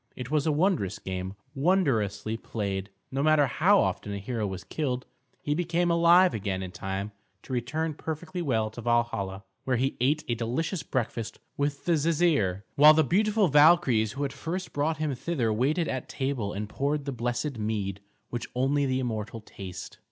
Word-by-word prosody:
It 125 +1 -7
was 150 0 +1
a - - +4
wondrous 150 - +1
game, 95 +1 -5 0.2
wondrously 135 - +1
played. 100 -3 -4 0.2
No 135 +1 -1
matter 155 -1 +5
how 185 - +4
often 105 - -1
a - - -3
hero 110 +1 -2
was 95 -2 -6
killed, 130 - -2 0.4
he 145 - 0
became 175 +1 +1
alive 170 +2 +6
again 95 -3 -2
in 90 - -6
time 95 +3 -4 0.3
to 130 - -7
return 155 +7 -1
perfectly 160 +3 -5
well 110 -8 0
to 120 - -8
Valhalla, 110 -5 0 0.2
where 130 -2 +1
he 135 +3 0
ate 150 +5 +2
a 120 - +1
delicious 125 - -2
breakfast 115 -3 -3 0.2
with 145 0 -2
the 175 - +1
Jisir; 150 - +2
while 150 +2 +8
the 160 - +5
beautiful 210 - +2
Valkyries 145 -8 +5
who 140 +2 -3
had 135 -2 -2
first 170 +6 -5
brought 155 +2 0
him 155 -2 -1
thither 125 -4 -1
waited 145 +9 +1
at 130 -2 -4
table 130 -7 -2
and 105 +1 -4
poured 140 +5 -1
the 140 - -2
blessed 120 +2 -2
mead, 105 -3 -2 0.3
which 120 0 -4
only 140 +2 +2
the 130 0 0
immortal 115 -3 -3
taste. 95 -4 -9
130 Hz, 175 wpm, -28 LUFS, 110-155 Hz, 0.4 s, while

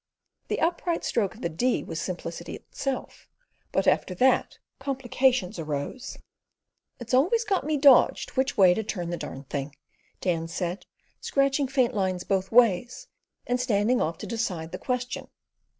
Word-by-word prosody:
The - - -1
upright 340 0 0
stroke 220 -2 0
of 225 - -14
the - - 0
D 245 +11 0
was - - -5
simplicity - - -5
itself, 270 -2 -5 0.4
but - - +1
after 185 - +2
that 260 +7 +2 0.2
complications 260 -6 0
arose. 155 - -4 0.8
"It's 240 0 -7
always 360 - +4
got 390 - 0
me 310 -1 +1
dodged 275 -1 +5
which 265 0 0
way 185 -3 +7
to 220 - -1
turn 180 -5 -4
the 175 - -2
darned 135 -3 -8
thing," 140 0 -3 0.4
Dan 165 -3 -1
said, 175 +2 -4 0.3
scratching 275 0 +1
faint 255 -2 +1
lines 185 -3 -1
both 190 0 -1
ways, 240 0 +3 0.4
and 245 0 0
standing 240 0 +2
off 165 +1 -1
to - - -7
decide 180 -8 -3
the - - -6
question. 250 -1 -3
235 Hz, 150 wpm, -26 LUFS, 180-265 Hz, 0.8 s, way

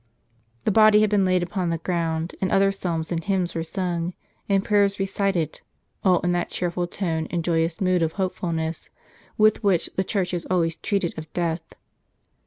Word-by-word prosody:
The - - +3
body 215 0 +6
had 215 -1 +2
been 200 -2 +3
laid 185 -1 +2
upon 180 0 -2
the 165 - 0
ground, 165 -1 -2
and 190 - 0
other 195 0 +4
psalms 170 -4 -3
and 165 -1 -1
hymns 185 -2 0
were 165 - -2
sung, 175 0 -3 0.3
and 195 0 +2
prayers 200 -1 +3
recited, 195 -5 -1 0.4
all 185 -3 +4
in 175 - +1
that 175 0 -1
cheerful 175 0 -2
tone 165 -4 -2
and 175 -2 -2
joyous 165 0 0
mood 185 -2 +2
of 160 -1 0
hopefulness, 170 -4 -3 0.5
with 215 0 +4
which 190 -5 +2
the 190 - +2
Church 190 -2 -1
has 175 -2 -3
always 170 -2 +1
treated 195 -1 -1
of 155 0 -10
death. 165 -1 -2
180 Hz, 180 wpm, -24 LUFS, 165-195 Hz, 0.5 s, body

